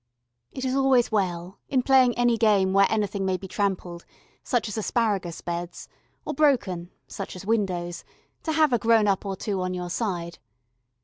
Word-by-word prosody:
It 260 Hz, -, -5 dB
is 260 Hz, -, 0 dB
always 265 Hz, -3 st, +3 dB
well, 180 Hz, -3 st, -2 dB
in 260 Hz, -2 st, +1 dB
playing 255 Hz, -3 st, +4 dB
any 240 Hz, -1 st, +3 dB
game 205 Hz, -4 st, +3 dB
where 195 Hz, 0 st, +5 dB
anything 205 Hz, -2 st, -1 dB
may 190 Hz, -1 st, 0 dB
be 190 Hz, -, -9 dB
trampled, 185 Hz, -3 st, -2 dB, 0.4 s
such 245 Hz, -3 st, 0 dB
as 210 Hz, -, -5 dB
asparagus 210 Hz, -6 st, -1 dB
beds, 175 Hz, 0 st, -5 dB, 0.4 s
or -, -, -3 dB
broken, 235 Hz, -, +1 dB, 0.2 s
such 195 Hz, -, -7 dB
as 185 Hz, +1 st, -9 dB
windows, 185 Hz, -6 st, -1 dB, 0.4 s
to 320 Hz, -, -2 dB
have 310 Hz, -4 st, +3 dB
a 240 Hz, -, +3 dB
grown 225 Hz, -2 st, +3 dB
up 200 Hz, 0 st, 0 dB
or 195 Hz, -, -2 dB
two 195 Hz, 0 st, -3 dB
on 185 Hz, 0 st, -2 dB
your 180 Hz, -1 st, -5 dB
side. 175 Hz, -6 st, -3 dB
200 Hz, 175 wpm, -25 LUFS, 185-235 Hz, 0.4 s, where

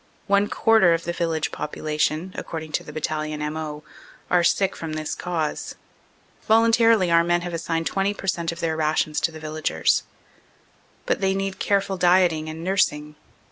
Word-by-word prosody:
One 200 Hz, 0 st, +3 dB
quarter 215 Hz, -8 st, +4 dB
of 165 Hz, -, -5 dB
the 170 Hz, -, -3 dB
village 165 Hz, -3 st, -1 dB
popula 150 Hz, 0 st, -5 dB
tion, 160 Hz, +5 st, 0 dB
according 160 Hz, -1 st, -6 dB
to -, -, -1 dB
the -, -, -10 dB
Battalion 155 Hz, 0 st, -3 dB
M.O., 150 Hz, 0 st, -4 dB, 0.5 s
are 180 Hz, -1 st, +4 dB
sick 195 Hz, +2 st, +2 dB
from 160 Hz, -1 st, -6 dB
this 155 Hz, 0 st, -3 dB
cause. 165 Hz, -4 st, -3 dB, 0.7 s
Voluntarily 225 Hz, -3 st, +4 dB
our 170 Hz, 0 st, +5 dB
men 175 Hz, 0 st, +1 dB
have 175 Hz, 0 st, -5 dB
assigned 165 Hz, 0 st, -2 dB
20 195 Hz, +3 st, 0 dB
per 195 Hz, -, -9 dB
cent, 170 Hz, -3 st, -1 dB
of 170 Hz, -, -8 dB
their 160 Hz, -1 st, 0 dB
rations 155 Hz, -1 st, 0 dB
to 165 Hz, -, +1 dB
the 160 Hz, -, -10 dB
villagers. 155 Hz, 0 st, 0 dB, 1.0 s
But -, -, 0 dB
they 190 Hz, 0 st, +1 dB
need 195 Hz, 0 st, -3 dB
careful 200 Hz, -1 st, 0 dB
dieting 175 Hz, -3 st, +3 dB
and 160 Hz, +1 st, -7 dB
nursing. 150 Hz, -5 st, 0 dB
170 Hz, 170 wpm, -23 LUFS, 155-190 Hz, 1.0 s, our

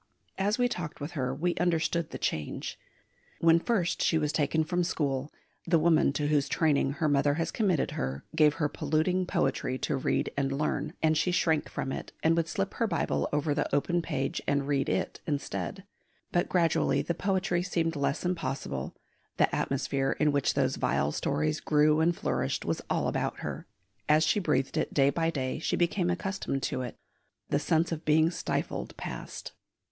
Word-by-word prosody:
As 205 Hz, +3 st, +1 dB
we 245 Hz, 0 st, +3 dB
talked 175 Hz, -10 st, -5 dB
with 145 Hz, +3 st, -5 dB
her 130 Hz, -5 st, -2 dB
we 170 Hz, +6 st, 0 dB
understood 170 Hz, -1 st, +1 dB
the -, -, -6 dB
change. 75 Hz, -1 st, -3 dB, 0.6 s
When 165 Hz, 0 st, +5 dB
first 185 Hz, -3 st, 0 dB
she 160 Hz, -, +3 dB
was 150 Hz, -2 st, 0 dB
taken 160 Hz, +1 st, +2 dB
from 175 Hz, +2 st, 0 dB
school 140 Hz, -4 st, -1 dB, 0.4 s
the 170 Hz, -, +4 dB
woman 160 Hz, -3 st, +4 dB
to 145 Hz, +1 st, -1 dB
whose 145 Hz, -2 st, +2 dB
training 145 Hz, -4 st, +2 dB
her 155 Hz, +1 st, 0 dB
mother 145 Hz, 0 st, +3 dB
has 165 Hz, 0 st, -1 dB
committed 190 Hz, -8 st, +1 dB
her 65 Hz, +2 st, -4 dB
gave 150 Hz, -2 st, +5 dB
her 150 Hz, -, +1 dB
polluting 175 Hz, +5 st, 0 dB
poetry 130 Hz, -6 st, 0 dB
to 145 Hz, -, -1 dB
read 135 Hz, -, 0 dB
and 135 Hz, -1 st, 0 dB
learn, 145 Hz, +3 st, -1 dB
and 160 Hz, 0 st, +4 dB
she 155 Hz, -, +2 dB
shrank 160 Hz, -3 st, +1 dB
from 135 Hz, -, -3 dB
it, -, -, -6 dB
and 165 Hz, +1 st, +4 dB
would 165 Hz, -1 st, +1 dB
slip 100 Hz, -12 st, -2 dB
her -, -, 0 dB
Bible 70 Hz, 0 st, 0 dB
over 150 Hz, 0 st, +1 dB
the 145 Hz, -, -1 dB
open 175 Hz, +5 st, +1 dB
page 145 Hz, -5 st, -2 dB
and 140 Hz, -1 st, +1 dB
read 140 Hz, -2 st, +1 dB
it -, -, -1 dB
instead. 155 Hz, +6 st, -3 dB, 0.5 s
But 175 Hz, -, +1 dB
gradually 160 Hz, -5 st, +2 dB
the 170 Hz, -, -1 dB
poetry 185 Hz, -1 st, 0 dB
seemed 165 Hz, -3 st, -1 dB
less 140 Hz, +4 st, -1 dB
impossible; 135 Hz, -, -3 dB, 0.4 s
the -, -, +3 dB
atmosphere 135 Hz, 0 st, 0 dB
in 150 Hz, -1 st, +4 dB
which 140 Hz, -1 st, +1 dB
those -, -, +1 dB
vile 75 Hz, +2 st, +1 dB
stories 75 Hz, +1 st, 0 dB
grew 150 Hz, 0 st, +3 dB
and 170 Hz, +2 st, +3 dB
flourished -, -, -1 dB
was -, -, -1 dB
all -, -, +1 dB
about -, -, -2 dB
her; -, -, -5 dB, 0.4 s
as 155 Hz, +1 st, +5 dB
she 205 Hz, -, +2 dB
breathed 145 Hz, -7 st, 0 dB
it -, -, -1 dB
day 140 Hz, -1 st, +5 dB
by 165 Hz, +3 st, 0 dB
day 130 Hz, -5 st, -2 dB
she -, -, 0 dB
became 175 Hz, +1 st, +1 dB
accustomed 180 Hz, -6 st, -2 dB
to -, -, -1 dB
it; 120 Hz, -2 st, -6 dB, 0.5 s
the 145 Hz, -, +2 dB
sense 165 Hz, +2 st, +1 dB
of 165 Hz, -1 st, -3 dB
being 160 Hz, +2 st, +4 dB
stifled -, -, -3 dB
passed. -, -, -6 dB
155 Hz, 185 wpm, -29 LUFS, 140-170 Hz, 0.6 s, When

